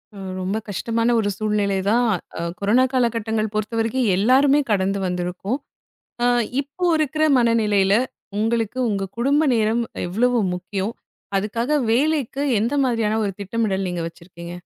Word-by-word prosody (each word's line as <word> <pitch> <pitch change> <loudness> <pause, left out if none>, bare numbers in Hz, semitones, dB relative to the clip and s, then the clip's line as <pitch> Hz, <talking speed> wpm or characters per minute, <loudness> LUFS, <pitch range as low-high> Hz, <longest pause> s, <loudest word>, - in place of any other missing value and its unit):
அ - - -11 0.2
ரொம்ப 190 +3 -1
கஷ்டமான 230 +4 0
ஒரு 205 -2 0
சூழ்நெலைதான். 210 +2 +1 0.3
அ - - -3 0.2
கொரோனா 215 +6 +3
காலகட்டங்கள் 225 -3 0
பொறுத்தவரைக்கும் 225 +3 0
எல்லாருமே 270 +7 +4
கடந்து 195 0 +1
வந்துருக்கோம். 180 +7 -2 0.6
அ - - +3 0.3
இப்போ 290 +6 -6
இருக்குற 310 0 +1
மனநிலையில 210 -5 +3 0.5
உங்களுக்கு 225 +2 0
உங்க 195 -3 -2
குடும்ப 280 +5 +3
நேரம் 225 +1 +1 0.2
எவ்வளவு 240 +7 +1 0.2
முக்கியம்? 190 +3 -3 0.4
அதுக்காக 225 +6 -2 0.2
வேலைக்கு 280 +1 +1 0.2
எந்த 235 +6 0
மாரியான 225 -3 +1
ஒரு 200 - -1
திட்டமிடல் 200 -1 -1
நீங்க 175 -1 -3
வச்சிருக்கீங்க? 170 0 -11
220 Hz, 125 wpm, -22 LUFS, 195-240 Hz, 0.6 s, எல்லாருமே